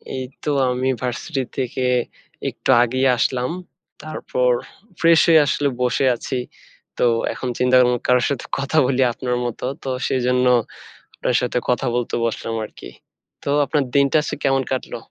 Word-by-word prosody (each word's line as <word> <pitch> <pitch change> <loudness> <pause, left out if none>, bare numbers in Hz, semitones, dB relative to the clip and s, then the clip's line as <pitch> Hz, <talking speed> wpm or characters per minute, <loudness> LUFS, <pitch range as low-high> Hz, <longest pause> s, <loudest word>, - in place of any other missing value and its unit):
এই 130 - -3 0.2
তো - - -2 0.2
আমি 125 +1 -1
ভার্সিটি 130 +3 -3
থেকে 130 0 -2 0.7
একটু - - -7
আগেই 130 +2 +1
আসলাম। 125 +2 0 0.5
তারপর 125 -5 -1 0.5
fresh 165 -1 +5
হয়ে 160 -1 +7
আসলে 145 +1 +1
বসে 125 +2 +1
আছি। 130 - -5 0.6
তো - - 0 0.3
এখন 130 - -4
চিন্তা 125 0 +3
করলাম 125 -1 +2
কারো 125 0 +4
সাথে 140 -3 -3
কথা 140 +3 -1
বলি 130 0 +1
আপনার 125 0 -2
মতো। 120 0 -4 0.2
তো 135 - -4 0.2
সেজন্য 125 0 +1 0.7
আপনার 125 - -1
সাথে 125 0 -1
কথা 125 +2 +1
বলতে 120 -1 -1
বসলাম 115 0 -3
আরকি। - - -12 0.5
তো - - -3 0.2
আপনার 145 0 +1
দিনটা 140 +1 +4
আজকে - - -3
কেমন 135 -1 +2
কাটলো? 130 - -3
130 Hz, 150 wpm, -21 LUFS, 125-135 Hz, 0.7 s, হয়ে